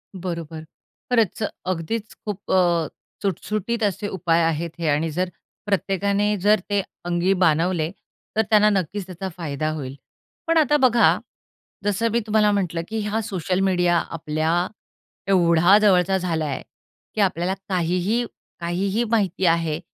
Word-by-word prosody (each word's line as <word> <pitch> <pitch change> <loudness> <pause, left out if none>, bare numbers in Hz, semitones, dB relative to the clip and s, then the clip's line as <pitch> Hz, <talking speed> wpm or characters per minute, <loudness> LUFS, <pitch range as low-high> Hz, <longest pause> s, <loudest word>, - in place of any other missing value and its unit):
बरोबर, 170 -3 -5 0.5
खरंच, 225 -3 +2 0.2
अगदीच 185 +5 -3
खूप 205 -2 -4
अ, 175 -3 +3 0.3
सुटसुटीत 215 +4 -2
असे 205 0 0
उपाय 170 -3 +1
आहेत 165 +1 0
हे 165 - -1
आणि 150 +3 +1
जर 180 +3 -1 0.4
प्रत्येकाने 200 +1 +1
जर 210 +2 +4
ते 205 -1 +2 0.2
अंगी 175 +2 +2
बाणवले 165 0 +2 0.5
तर - - +6
त्यांना 210 -1 +5
नक्कीच 195 0 -1
त्याचा 190 +1 -6
फायदा 155 -2 -2
होईल. 135 -3 -6 0.5
पण 330 0 +3
आता 295 -1 +4
बघा, 250 -4 +4 0.7
जसं 205 +3 +1
मी 235 - +2
तुम्हाला 210 -1 +3
म्हटलं, 180 -5 -1
की 220 0 -3
हा 210 +2 -1
सोशल 185 -3 -2
मीडिया 180 -2 +3
आपल्या 160 +2 -1 0.6
एवढा 175 0 +5
जवळचा 190 -2 +4
झालाय 165 -5 -1
आहे - - -6 0.5
की 215 - +1
आपल्याला 185 -1 +1 0.2
काहीही, 185 +6 0 0.3
काहीही 190 +6 -1
माहिती 195 -4 +1
आहे 165 -2 +2
185 Hz, 135 wpm, -23 LUFS, 170-205 Hz, 0.7 s, तर